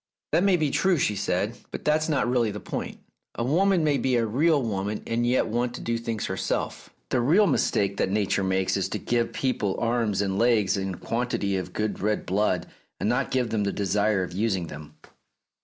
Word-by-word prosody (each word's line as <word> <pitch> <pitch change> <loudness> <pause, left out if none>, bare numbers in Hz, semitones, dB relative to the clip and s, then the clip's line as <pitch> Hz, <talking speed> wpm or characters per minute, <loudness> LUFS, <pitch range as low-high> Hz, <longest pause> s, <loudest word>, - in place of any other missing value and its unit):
"That 175 - +3
may 195 -2 +4
be 155 -4 0
true," 190 -2 +2
she 105 -7 +1
said; 100 +3 -1
"but - - -7
that's 155 +1 +2
not 145 -5 +1
really 120 -2 +2
the 105 0 -5
point. - - -5 0.4
A 115 - -2
woman 175 +6 +3
may 145 -2 +2
be 130 -1 +1
a 115 -1 +2
real 145 +8 +3
woman 105 -1 -2
and 120 +1 0
yet 125 +1 +2
want 120 +2 -1
to - - -6
do 115 - -1
things 115 -2 -3
herself. 95 0 -3 0.2
The 125 - +1
real 170 - +4
mistake 100 - +1
that - - +1
Nature 100 -1 +1
makes 95 0 +1
is - - -1
to - - -2
give 120 -1 0
people 115 -7 -1
arms 115 -4 +1
and 95 -1 -1
legs 115 -5 +3
and 95 -1 -2
a - - -12
quantity 115 -4 -1
of 90 -1 -3
good 105 -1 -2
red 105 +1 -1
blood, 95 -2 +1 0.3
and - - 0
not 125 +3 0
give 125 -3 0
them 110 -2 0
the 100 - 0
desire 100 0 +1
of 90 - -6
using 95 -2 0
them." 75 0 -10
115 Hz, 210 wpm, -26 LUFS, 100-125 Hz, 0.4 s, may